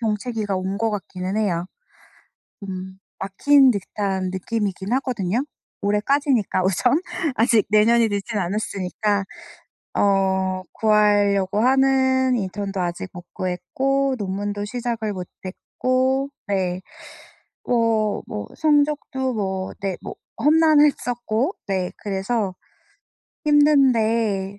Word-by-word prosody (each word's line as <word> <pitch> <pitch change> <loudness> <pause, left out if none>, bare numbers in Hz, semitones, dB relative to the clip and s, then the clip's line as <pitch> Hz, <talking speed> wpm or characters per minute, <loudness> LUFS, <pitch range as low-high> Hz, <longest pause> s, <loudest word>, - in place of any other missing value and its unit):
정체기가 215 -2 -2
온 190 +1 -2
것 225 0 +1
같기는 190 -1 -4
해요. 180 -5 0 1.0
음 190 -1 -7 0.2
막힌 265 +8 +4
듯한 195 -2 -2
느낌이긴 200 0 -3
하거든요. 250 -2 -1 0.4
올해까지니까 210 0 +1
우선 240 - +2 0.4
아직 230 -2 +3
내년이 225 +2 +4
늦진 205 +2 -3
않았으니까 200 +1 -1 0.7
어 190 -1 +1
구하려고 205 -2 +3
하는 260 0 +3
인턴도 195 0 -3
아직 175 +1 -3
못 175 0 -10
구했고 265 +10 -1
논문도 205 +1 -3
시작을 230 -1 -3
못 180 -2 -6 0.2
했고 260 +7 -1 0.2
네 185 -2 -1 0.8
뭐 225 -3 +1
뭐 105 -1 -5
성적도 290 -4 +1
뭐 190 -2 -3
네 195 -2 -2
뭐 - - -7 0.3
험난했었고 290 - +3
네 190 -2 -1
그래서 195 0 -2 0.9
힘든데 230 -9 +3
210 Hz, 220 characters per minute, -22 LUFS, 190-250 Hz, 1.0 s, 막힌